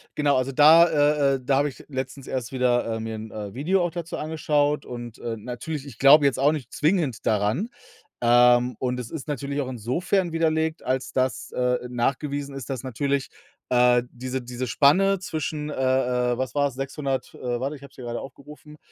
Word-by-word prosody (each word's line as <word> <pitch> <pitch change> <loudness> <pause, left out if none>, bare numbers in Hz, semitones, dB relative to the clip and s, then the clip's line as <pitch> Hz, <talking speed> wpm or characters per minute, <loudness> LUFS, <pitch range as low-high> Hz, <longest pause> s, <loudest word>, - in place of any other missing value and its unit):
genau, 145 -2 +2
also 130 +1 -1
da 155 +5 +7
äh, 145 -2 +3
äh, - - -4
da 135 +1 +2
habe 145 +1 +2
ich 135 - -13
letztens 135 0 -5
erst 125 -3 -4
wieder 120 -3 +1
mir 110 0 -5
'n, 110 0 -7
äh, 105 -2 -6
Video 175 +8 +1
auch 175 - -2
dazu 170 0 -5
angeschaut 150 -2 0
und, 120 -2 -8
äh, 115 -1 -4
natürlich 130 +6 -6
ich 125 -4 -12
glaube 140 +2 +7
jetzt 140 -2 +2
auch 140 +2 +4
nicht 145 -7 -5
zwingend 155 - 0
daran, 110 - +1 0.5
ähm, 120 +1 +5
und 125 -1 -2
es 115 -2 -7
ist 155 -4 -6
natürlich 140 0 -3
auch 130 - -4
insofern 165 - -1
widerlegt, 160 0 0
als 130 0 -2
dass, 130 -2 -1
äh, 125 0 +1
nachgewiesen 140 +3 -2
ist, 135 -2 -6
dass 130 -3 -3
natürlich, 135 +2 -1 0.4
äh, 125 0 +4
diese 130 +1 -4
diese 125 +1 -5
Spanne 180 - +3
zwischen 155 -3 -4
äh, - - -4
äh, 125 -2 +1
was 130 +1 -3
war's, 140 -2 +1
600 135 +1 -4
äh, 120 -1 -3
warte, 140 +3 -3
ich 140 - -14
habe 140 - -12
es - - -23
hier 125 - -8
grade 120 0 -4
aufgerufen, 150 +2 -12
135 Hz, 195 wpm, -24 LUFS, 125-150 Hz, 0.5 s, da